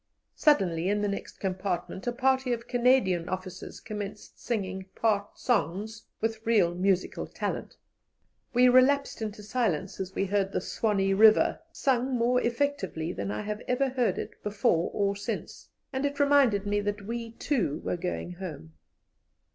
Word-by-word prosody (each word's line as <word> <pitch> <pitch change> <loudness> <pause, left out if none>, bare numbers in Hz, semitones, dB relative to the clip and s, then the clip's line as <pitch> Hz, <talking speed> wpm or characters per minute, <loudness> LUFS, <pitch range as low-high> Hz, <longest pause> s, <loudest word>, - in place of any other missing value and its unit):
Suddenly 185 - +3
in 205 0 +1
the - - +2
next 200 0 -4
compartment 185 +1 -3
a - - +2
party 260 +1 +1
of 235 0 -5
Canadian 240 -9 +2
officers 185 0 -6
commenced 210 -1 -7
singing 190 -5 -3
part 205 -3 0
songs 215 - -1
with 225 0 -2
real 210 -7 +3
musical 185 +1 0
talent. - - -4 0.7
We 250 0 +5
relapsed 260 +1 +4
into 210 -1 -5
silence 200 -6 -1
as 190 0 -5
we 195 - +1
heard 195 0 0
the - - +1
"Swanee 195 -3 0
River" 215 +2 +5
sung 260 -3 +1
more 245 +2 +2
effectively 235 - -1
than 100 0 -4
I 105 +1 -2
have 210 +1 -4
ever 265 +2 +1
heard 250 -2 0
it - - -6
before 200 -5 +1
or 200 -1 0
since, 200 - -6 0.2
and 265 +1 -1
it 285 0 -1
reminded 280 -8 +4
me 205 0 +1
that 205 0 -3
we, 230 +1 -5
too, 220 - -1
were - - 0
going 180 0 -4
home. 165 - -8
210 Hz, 155 wpm, -28 LUFS, 190-245 Hz, 0.7 s, We